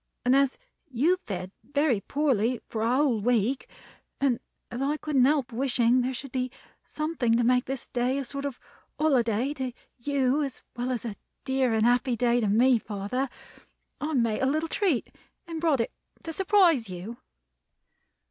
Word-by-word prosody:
and 250 +1 +5
as 275 -1 +3 0.3
you 270 +7 +2
have 365 - +1
fared 185 - -5
very 285 -5 +1
poorly 255 -3 +1
for 220 - -4
a 230 +3 +2
whole 265 -5 +2
week, 240 +3 +1 0.5
and 260 -4 +2 0.3
as 240 - -4
I 290 +2 0
couldn't 285 -5 +2
help 275 -3 +2
wishing 245 0 +2
there 250 +1 -1
should 265 +1 -7
be 255 -1 -1 0.3
something 300 -7 0
to 240 - +2
make 250 +1 +3
this 270 -1 -5
day 250 +2 0
a 280 - -1
sort 280 +2 -5
of 280 -3 -4 0.4
holiday 255 -3 +2
to 260 -3 -3 0.3
you 275 +2 +1
as 275 -3 -4
well 245 +1 -2
as 240 -2 -3
a 215 -3 -5 0.3
dear 265 -3 +1
and 220 0 +3
happy 245 +1 +3
day 240 +1 +2
to 215 - +1
me, 235 +4 +4
father, 215 +6 -3 0.7
I 305 +1 -2
made 230 -4 +1
a 265 - +3
little 310 +4 0
treat 360 - 0 0.3
and 330 -2 -5
brought 305 -7 +3
it 230 - -2 0.3
to 325 - -4
surprise 360 - +3
you." 185 +6 -7
255 Hz, 175 wpm, -27 LUFS, 235-280 Hz, 0.7 s, and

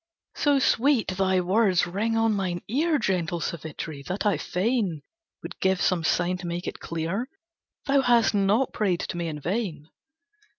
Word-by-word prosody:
"So 290 -1 +3
sweet 265 -1 +2
thy 190 0 +1
words 185 0 +3
ring 210 +6 -1
on 225 -1 +3
mine 185 -3 -2
ear, 305 +7 +1
Gentle 180 - -1
Savitri, 160 -2 -5
that 185 +4 -3
I 205 -3 +3
fain 185 - -1 0.4
Would 170 +1 -8
give 190 -1 +2
some 175 -1 +1
sign 175 +3 +1
to 175 -1 -7
make 170 +1 -4
it - - -5
clear 170 +10 -3 0.6
Thou 275 -1 +3
hast 240 -4 +3
not 205 +5 +2
prayed 190 -6 0
to - - -4
me 170 -1 -2
in 155 -2 -5
vain. 170 - -3
190 Hz, 165 wpm, -26 LUFS, 175-225 Hz, 0.6 s, So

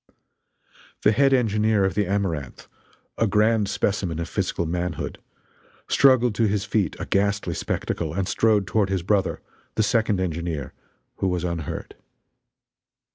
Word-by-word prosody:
The 105 - +5
head 135 +4 +3
engineer 110 -4 +2
of 95 - 0
the 100 0 0
Amaranth, 90 -9 -2 0.5
a 115 - +3
grand 105 0 +2
specimen 95 -5 -1
of 85 - -3
physical 85 - -2
manhood, 90 0 -3 0.7
struggled 130 -4 +4
to 110 +1 +2
his 100 -1 -1
feet 100 -7 0
a - - -3
ghastly 100 +1 0
spectacle - - -3
and 95 -1 -1
strode 105 -1 +2
toward 100 +1 +1
his 95 -3 -1
brother, 100 +1 0 0.3
the 110 - +2
second 110 -2 +1
engineer, 85 -5 -3 0.4
who 95 - 0
was 90 -2 -1
unhurt. 85 -4 -4
100 Hz, 135 wpm, -24 LUFS, 90-110 Hz, 0.7 s, The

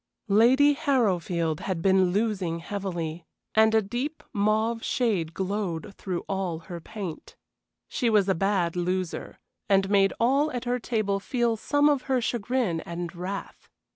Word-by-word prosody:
Lady 260 +7 +6
Harrowfield 185 - 0
had 185 -3 -3
been 190 +1 +4
losing 195 -4 0
heavily, 170 -3 -4 0.3
and 220 0 +5
a 220 - +4
deep 250 +10 -4
mauve 220 +2 +1
shade 200 -10 0
glowed 190 -2 -3
through 185 -3 -4
all 190 -4 -2
her 170 +1 -8
paint. 195 -4 -7 0.5
She 245 -4 0
was 210 -3 +3
a 190 - +3
bad 185 -2 0
loser, 180 0 -2 0.3
and 195 0 +3
made 195 -1 +4
all 275 +6 +3
at 245 0 -4
her 245 +1 0
table 215 -4 -1
feel 235 +2 0
some 290 +6 +2
of 290 -3 +3
her 260 -1 +3
chagrin 235 -5 -1
and 170 +1 -6
wrath. 185 +3 -6
200 Hz, 145 wpm, -26 LUFS, 180-235 Hz, 0.5 s, Lady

